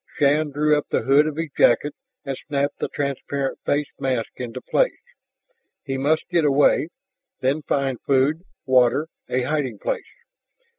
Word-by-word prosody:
Shann 150 +2 +3
drew 150 +1 +2
up 150 - -2
the - - 0
hood 140 +5 +4
of 155 - -3
his 165 -2 -3
jacket 145 +5 +3 0.3
and 135 -1 -3
snapped 140 +1 -2
the - - -1
transparent 140 -1 -3
face 145 0 0
mask 130 -4 -1
into 125 0 -5
place. - - +1 0.9
He 135 -2 -2
must 155 +4 +1
get 170 -2 +3
away 145 +2 +3 0.5
then 135 +4 +1
find 135 -4 -1
food, 140 +4 +2 0.2
water, 130 +4 +3 0.2
a 125 0 0
hiding 135 -5 -1
place. - - -2
140 Hz, 150 wpm, -23 LUFS, 130-150 Hz, 0.9 s, hood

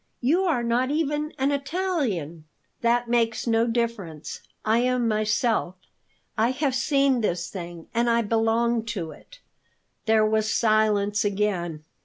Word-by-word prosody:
You 330 +10 +2
are 285 -9 +1
not 240 +2 +1
even 300 0 -1
an 270 +2 +1
Italian." 275 - -2 0.4
"That 235 +1 +2
makes 230 -1 +1
no 230 0 +2
difference; 230 -10 -3 0.2
I 220 +2 +3
am 250 -1 +1
myself. 215 -2 0 0.6
I 225 +2 +2
have 265 +1 0
seen 275 -1 +2
this 175 -5 -2
thing, 175 -3 -7
and 235 +1 +2
I 235 0 +3
belong 225 +1 +1
to 165 -4 -4
it." - - -16 0.7
There 220 -1 +4
was 215 0 +1
silence 215 -2 +2
again. 195 -6 -1
230 Hz, 135 wpm, -25 LUFS, 210-255 Hz, 0.7 s, There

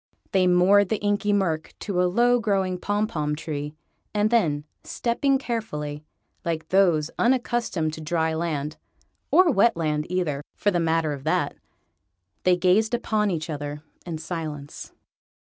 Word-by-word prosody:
They 185 -1 +3
moored 185 +2 +5
the 220 - +1
Inky 205 0 0
Murk 175 -6 0
to 185 -4 0
a 180 - +3
low 245 +5 +3
growing 195 -5 0
pom 205 +3 0
pom 150 -8 -2
tree, 150 -1 -5 0.4
and 210 +1 +2
then, 155 -11 +2 0.2
stepping 270 +3 0
carefully, 155 - -4 0.4
like 160 -1 -3
those 175 -5 +3
unaccustomed 235 -10 +1
to 160 - -7
dry 160 0 0
land 155 -2 -2 0.5
(or 365 -3 +5
wet 230 -3 +3
land 150 -2 -1
either, 170 -6 -1
for 205 - +1
the 175 - +1
matter 165 -2 +1
of 140 -2 -8
that), 160 - 0 0.9
they 180 -1 +5
gazed 195 +6 +3
upon 215 -3 0
each 160 -4 -2
other 145 -1 -5 0.2
in 170 -3 -5
silence. 155 -3 -6
180 Hz, 145 wpm, -25 LUFS, 155-205 Hz, 0.9 s, moored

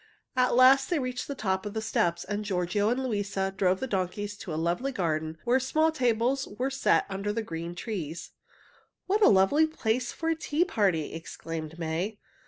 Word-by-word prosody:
At 250 -1 +3
last 265 +2 +6
they 345 - +1
reached 255 -3 -3
the 280 - -4
top 190 -5 -1
of 210 +1 -6
the - - 0
steps, 170 -5 0
and 205 +1 -3
Giorgio 195 +1 0
and 255 +3 0
Luisa 200 -5 -1
drove 185 -1 +2
the - - -2
donkeys 205 -1 -2
to 180 - -7
a - - -2
lovely 170 - -1
garden 160 -7 -2
where 245 +2 +3
small 315 +5 +2
tables 250 -1 +1
were 265 +2 -1
set 270 - +2
under 195 +1 -3
the 225 +2 -2
green 170 -2 -5
trees. 175 -6 -5 0.7
"What 410 +3 +1
a - - +8
lovely 205 +12 +4
place 245 -5 -1
for 325 - -3
a 325 - +2
tea 320 +1 0
party!" 190 - 0
exclaimed 165 -1 -6
May. 170 +6 -2
210 Hz, 190 wpm, -28 LUFS, 180-255 Hz, 0.7 s, a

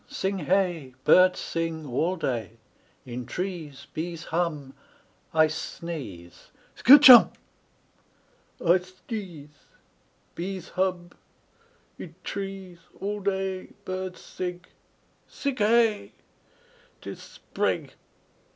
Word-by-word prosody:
Sing 195 0 -3
hey! 175 -9 0
Birds 185 0 +6
sing 165 -1 -3
All 155 +8 -1
day. 115 - -3 0.5
In 125 -1 -6
trees 175 -7 -5
Bees 165 +1 -5
hum 160 -6 -2 0.6
I 160 0 +5
sneeze 150 - -7 0.3
Skatch 285 +3 +8
Humb!! 250 -3 +10 1.3
I 175 +2 +4
sdeeze. 185 - -8 0.8
Bees 185 0 -6
hub. 180 -2 -2 0.9
Id 165 -3 -9
trees 195 -3 -6 0.2
All 205 +1 -3
day 190 -1 -3
Birds 185 -1 -5
sig. 180 0 -6 0.6
Sig 280 -3 -4
Hey! 220 0 +2 0.9
'Tis - - -8
Sprig! - - -3
180 Hz, 90 wpm, -26 LUFS, 160-195 Hz, 1.3 s, Humb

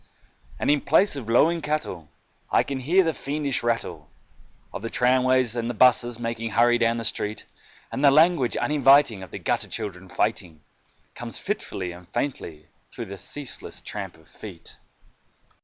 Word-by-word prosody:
And - - +1
in 145 -1 +2
place 200 -5 +3
of 125 -5 -7
lowing 165 +8 +3
cattle, 150 - -3 0.4
I - - +3
can 140 -1 -4
hear 170 +9 +3
the 165 -2 0
fiendish 145 -2 -2
rattle 90 -10 -3 0.6
Of - - -6
the 115 - -4
tramways 130 -1 +2
and 120 0 -2
the 120 - -4
buses 120 0 +4
making 115 -1 -3
hurry 120 +3 +3
down 115 0 +2
the 115 - -4
street; 105 -1 -1 0.5
And 135 - -3
the 140 - +8
language 155 -2 +3
uninviting 140 -7 +4
of 95 - -9
the - - -7
gutter - - -1
children 95 -2 -5
fighting 90 -8 -2 0.5
Comes - - -5
fitfully 90 -2 -4
and 90 0 -13
faintly 100 - -4 0.3
through 115 - -7
the 100 -1 -8
ceaseless 145 +6 -5
tramp 95 -5 -6
of 80 -1 -23
feet. 90 0 -11
120 Hz, 160 wpm, -24 LUFS, 100-140 Hz, 0.6 s, the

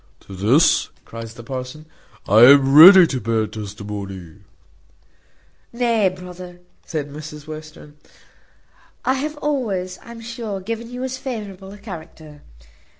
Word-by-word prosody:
"To 95 - -12
this," 115 - +3 0.2
cries 115 0 -9
the 120 - -11
parson, 130 +5 -7 0.4
"I 105 +3 +5
am 135 0 +6
ready 180 +5 +10
to 130 -6 -3
bear 110 0 0
testimony." 100 -4 -8 1.3
"Nay, 235 -4 +1
brother," 180 -1 -11 0.2
says 155 -4 -4
Mrs 150 +1 -10
Western, 155 -1 -11 1.1
"I 260 - +2
have 295 +3 -4
always, 215 -12 -3
I'm 235 -1 -11
sure, 230 -4 -6
given 230 +4 -6
you 250 +1 -6
as 260 0 -4
favourable 205 -7 -7
a 205 - -11
character. 160 -7 -11
165 Hz, 125 wpm, -20 LUFS, -, 1.3 s, ready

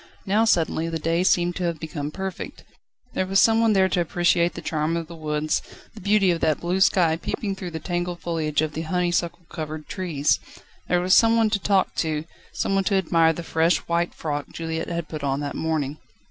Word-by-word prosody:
Now 210 +3 +3
suddenly 165 -4 +1
the 165 - -2
day 165 +2 0
seemed 175 -1 +2
to 180 - -1
have 170 -2 -2
become 155 -2 -4
perfect. 190 +3 -6 0.5
There 185 - -1
was 195 +1 +3
someone 225 -1 +4
there 190 -1 +4
to 180 - +1
appreciate 175 0 +2
the - - -5
charm 155 +1 -1
of 165 - -3
the 170 +1 -10
woods, 155 -1 -1 0.3
the 220 - -11
beauty 200 -1 +3
of 170 - -1
that 155 - +2
blue 180 +2 -1
sky 170 -4 +4
peeping 195 +4 -3
though 190 -2 -6
the 160 - -5
tangled 175 +1 -3
foliage 155 -3 -1
of 155 -1 -3
the 160 - -3
honeysuckle 175 0 -1
covered 155 -1 -6
trees. 150 -5 0 0.5
There 180 0 +2
was 185 +1 +3
some 230 0 +6
one 220 -2 +3
to 205 - +1
talk 195 -1 +2
to, 155 -1 -1 0.3
someone 195 0 0
to 200 - +2
admire 165 -3 +3
the 170 - -6
fresh 165 +1 +2
white 170 +1 0
frock 145 -2 -3
Juliette 165 0 -4
had 170 -2 -3
put 155 -2 -6
on 135 0 0
that 145 -1 -3
morning. 155 -2 -2
170 Hz, 205 wpm, -24 LUFS, 155-185 Hz, 0.5 s, some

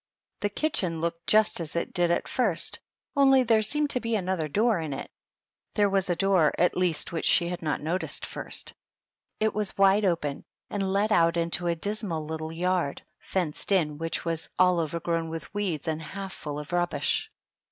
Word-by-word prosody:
The 205 - 0
kitchen 195 - -1
looked 170 +1 -3
just 215 -2 +4
as 165 -2 -4
it 170 - -2
did 175 -1 +2
at 170 - 0
first, 220 -10 0 0.4
only 270 -2 +5
there 225 -2 +3
seemed 295 +7 +2
to 250 - +1
be 230 -1 -1
another 185 -5 -1
door 215 +5 +2
in 155 -3 -3
it; 135 - -7 0.6
there 205 -1 +3
was 195 -1 +1
a 175 - +2
door, 185 -4 +3
at 180 - +2
least, 180 -3 +1
which 165 - -1
she 170 -1 +4
had 180 - -4
not 150 -2 -2
noticed 175 +5 -1
at - - -4
first. - - -3 0.7
It 220 0 +1
was 210 -2 -2
wide 195 +1 +5
open 165 -7 -1 0.3
and 195 -2 -1
led 205 +3 +1
out 170 -4 +4
into 170 +1 0
a 170 - +1
dismal 190 -3 -3
little 160 0 -5
yard, 175 -3 -1 0.2
fenced 180 -1 -2
in, 155 -6 +2
which 165 +1 -3
was 165 -1 -2
all 180 -1 +4
overgrown 165 +1 -2
with 160 -1 -7
weeds 190 -6 -2
and 160 0 -1
half 195 +4 -6
full 145 -1 -6
of 150 +3 -7
rub 175 0 +2
bish. 145 -1 +1
175 Hz, 195 wpm, -27 LUFS, 165-200 Hz, 0.7 s, only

